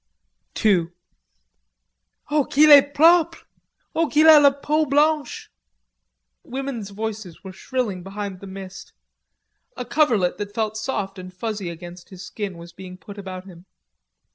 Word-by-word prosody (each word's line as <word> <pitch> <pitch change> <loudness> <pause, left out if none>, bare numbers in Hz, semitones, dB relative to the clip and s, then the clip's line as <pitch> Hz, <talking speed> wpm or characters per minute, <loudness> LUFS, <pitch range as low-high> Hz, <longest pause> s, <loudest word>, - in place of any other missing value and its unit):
II 185 -6 +3 1.4
"Oh, 295 -2 +2
qu'il 300 +2 +4
est 285 0 +8
propre! 330 +2 +4 0.5
Oh, 330 0 +1
qu'il 305 +1 +3
a 310 -1 +9
la 285 -1 +6
peau 295 +2 -1
blanche!" 295 +2 0 0.9
Women's 255 -5 -6
voices 210 -4 -7
were 190 -1 -9
shrilling 215 -3 -3
behind 195 0 -7
the 200 - -11
mist. 190 0 -10 0.8
A 250 - -5
coverlet 235 - +1
that 205 0 -6
felt 220 -1 -2
soft 205 -4 -4
and 185 0 -9
fuzzy 200 0 -5
against 175 +1 -11
his 185 -1 -11
skin 200 -5 -6
was 170 0 -12
being 185 0 -11
put 205 +2 -12
about 185 -1 -8
him. 180 -1 -15
210 Hz, 140 wpm, -22 LUFS, 185-280 Hz, 1.4 s, a